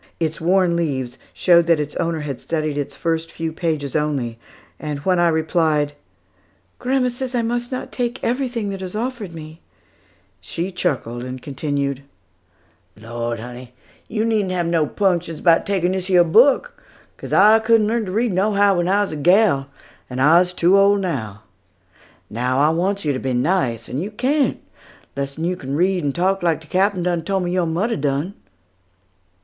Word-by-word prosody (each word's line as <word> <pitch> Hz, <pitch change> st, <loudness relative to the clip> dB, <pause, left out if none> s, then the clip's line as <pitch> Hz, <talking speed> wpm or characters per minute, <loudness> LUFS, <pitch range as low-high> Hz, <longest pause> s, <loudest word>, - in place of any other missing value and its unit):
Its 160 Hz, -1 st, -2 dB
worn 180 Hz, 0 st, +3 dB
leaves 130 Hz, -7 st, -2 dB
showed 170 Hz, -2 st, +4 dB
that 165 Hz, -2 st, +4 dB
its 150 Hz, 0 st, -4 dB
owner 165 Hz, -2 st, -1 dB
had 140 Hz, -3 st, -5 dB
studied 155 Hz, -2 st, -2 dB
its 145 Hz, -1 st, -4 dB
first 165 Hz, 0 st, -2 dB
few 165 Hz, -1 st, -4 dB
pages 155 Hz, -4 st, -2 dB
only; 140 Hz, -7 st, -1 dB, 0.4 s
and 150 Hz, -2 st, -4 dB
when 185 Hz, -2 st, +2 dB
I 175 Hz, -, +4 dB
replied, 160 Hz, -2 st, +1 dB, 0.9 s
"Grandma 255 Hz, 0 st, +1 dB
says 250 Hz, +1 st, -5 dB
that -, -, 0 dB
I -, -, +2 dB
must 240 Hz, +2 st, -2 dB
not 255 Hz, -, -5 dB
take 245 Hz, 0 st, -2 dB
everything 245 Hz, -4 st, -1 dB
that 195 Hz, -1 st, -5 dB
is 185 Hz, +1 st, -6 dB
offered 230 Hz, -4 st, -4 dB
me," 160 Hz, 0 st, -10 dB, 0.8 s
she 170 Hz, -, -4 dB
chuckled 130 Hz, -9 st, -2 dB
and 130 Hz, 0 st, -6 dB
continued: 140 Hz, 0 st, -3 dB, 1.0 s
"Lawd, 115 Hz, +1 st, -4 dB
honey, 125 Hz, +2 st, -9 dB, 0.3 s
yo 215 Hz, -1 st, -1 dB
needn't 220 Hz, -4 st, +1 dB
have 175 Hz, -2 st, 0 dB
no 165 Hz, -2 st, +1 dB
'punctions 175 Hz, -4 st, 0 dB
'bout 165 Hz, -2 st, +3 dB
takin' 185 Hz, -3 st, +1 dB
dis 190 Hz, 0 st, -3 dB
yer 180 Hz, -2 st, +6 dB
book, 260 Hz, -, +3 dB, 0.4 s
'cos -, -, -9 dB
I 215 Hz, +3 st, +6 dB
couldn't 220 Hz, -1 st, +3 dB
learn 225 Hz, +1 st, 0 dB
to 185 Hz, -, -5 dB
read 225 Hz, +1 st, 0 dB
nohow 200 Hz, 0 st, +3 dB
when 175 Hz, 0 st, 0 dB
I 200 Hz, +2 st, +3 dB
was 205 Hz, -, -1 dB
a -, -, -4 dB
gal, 175 Hz, -3 st, +3 dB, 0.4 s
and 125 Hz, 0 st, -5 dB
I's 170 Hz, +6 st, +5 dB
too 180 Hz, +2 st, +3 dB
ole 200 Hz, +1 st, +5 dB
to 200 Hz, -, -1 dB
now. 110 Hz, -, -4 dB, 0.8 s
Now, 125 Hz, +4 st, -1 dB
I 150 Hz, +2 st, +4 dB
wants 190 Hz, +3 st, -1 dB
yo 145 Hz, -, +1 dB
to 130 Hz, -, -3 dB
be 130 Hz, 0 st, -2 dB
nice; 125 Hz, -, 0 dB
and 135 Hz, -, -3 dB
yo 195 Hz, -, -4 dB
can't, 265 Hz, +7 st, 0 dB, 0.6 s
lessen 140 Hz, +4 st, -3 dB
yo 180 Hz, +1 st, 0 dB
can 140 Hz, -5 st, -5 dB
read 180 Hz, +2 st, +1 dB
and 140 Hz, -2 st, -1 dB
talk 190 Hz, +2 st, +1 dB
like 165 Hz, -3 st, +1 dB
de 160 Hz, -, -16 dB
Captain 185 Hz, +2 st, +1 dB
done 175 Hz, -1 st, 0 dB
tole 195 Hz, +3 st, -1 dB
me 175 Hz, -1 st, -2 dB
yo 180 Hz, -2 st, +1 dB
mudder 195 Hz, +9 st, -1 dB
done." 145 Hz, +5 st, -1 dB
170 Hz, 180 wpm, -20 LUFS, 145-200 Hz, 1.0 s, yer